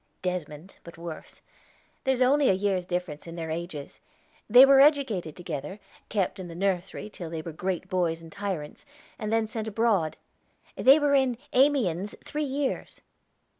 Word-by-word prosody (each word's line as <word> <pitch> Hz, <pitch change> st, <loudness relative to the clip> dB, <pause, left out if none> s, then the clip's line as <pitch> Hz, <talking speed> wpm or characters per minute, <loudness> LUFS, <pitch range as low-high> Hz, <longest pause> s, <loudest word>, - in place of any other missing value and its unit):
"Desmond; 180 Hz, -1 st, -5 dB
but 170 Hz, 0 st, -12 dB
worse. 165 Hz, -1 st, -9 dB, 0.6 s
There's 260 Hz, -1 st, +3 dB
only 280 Hz, +2 st, +4 dB
a -, -, +5 dB
year's 190 Hz, -2 st, -1 dB
difference 175 Hz, -4 st, -4 dB
in 165 Hz, -, -8 dB
their 165 Hz, -2 st, -4 dB
ages. 160 Hz, -3 st, -6 dB, 0.5 s
They 250 Hz, +4 st, +10 dB
were 275 Hz, 0 st, +7 dB
educated 265 Hz, -, +2 dB
together, 170 Hz, +2 st, -6 dB, 0.3 s
kept 195 Hz, -1 st, -1 dB
in 185 Hz, -, -6 dB
the 170 Hz, -, -9 dB
nursery 190 Hz, +1 st, -2 dB
till 180 Hz, -5 st, -8 dB
they 160 Hz, -1 st, -5 dB
were 165 Hz, -, -6 dB
great 185 Hz, +2 st, -3 dB
boys 175 Hz, -3 st, 0 dB
and 165 Hz, -1 st, -13 dB
tyrants, 195 Hz, -7 st, -5 dB, 0.4 s
and 215 Hz, -2 st, -3 dB
then 225 Hz, 0 st, +2 dB
sent 220 Hz, 0 st, -5 dB
abroad. 210 Hz, -7 st, +1 dB, 0.6 s
They 270 Hz, +3 st, +6 dB
were 290 Hz, -2 st, +2 dB
in 265 Hz, -3 st, +3 dB, 0.2 s
Amiens 225 Hz, -, +2 dB
three 300 Hz, -, -3 dB
years." 280 Hz, -1 st, -3 dB
190 Hz, 160 wpm, -27 LUFS, 170-245 Hz, 0.6 s, They